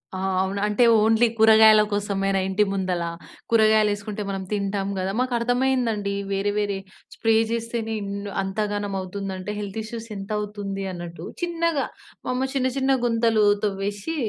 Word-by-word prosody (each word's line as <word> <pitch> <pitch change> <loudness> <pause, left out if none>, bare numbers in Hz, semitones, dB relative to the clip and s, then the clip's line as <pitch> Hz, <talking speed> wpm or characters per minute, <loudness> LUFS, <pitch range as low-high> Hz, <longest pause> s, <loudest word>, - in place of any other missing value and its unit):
ఆ! - - -4 0.2
అవును 195 +1 -2
అంటే 210 +4 +2 0.2
ఓన్లీ 225 +2 +4
కూరగాయల 220 -1 +7
కోసమేనా 195 -1 0
ఇంటి 195 +2 +2
ముందల, 185 -3 -1 0.5
కూరగాయలేసుకుంటే 215 -2 +2
మనం 195 -1 -3
తింటాం 200 -1 -1
గదా! 190 +1 -1
మాకు 255 0 0
అర్థమైందండి. 245 -4 0 0.2
వేరే, 195 +1 0
వేరే 205 -1 0 0.4
స్ప్రే 225 -1 +2 0.2
చేస్తేనే 230 -1 -2
ఇన్న్ 200 0 -5
అంత 195 +2 -4
ఘనం 205 -1 -3
అవుతుందంటే, 190 +1 -5
హెల్త్ 200 0 -5
ఇష్యూస్ 230 +1 -7
ఎంతౌతుంది 205 -1 -4
అన్నట్టు, 175 -1 -7 0.2
చిన్నగా 335 -3 0 0.4
మమ్మ 255 +1 0
చిన్న, 260 -1 +1
చిన్న 270 0 +2
గుంతలు 230 -2 +3 0.2
తవ్వేసి 205 +7 -2
210 Hz, 135 wpm, -24 LUFS, 195-230 Hz, 0.5 s, కూరగాయల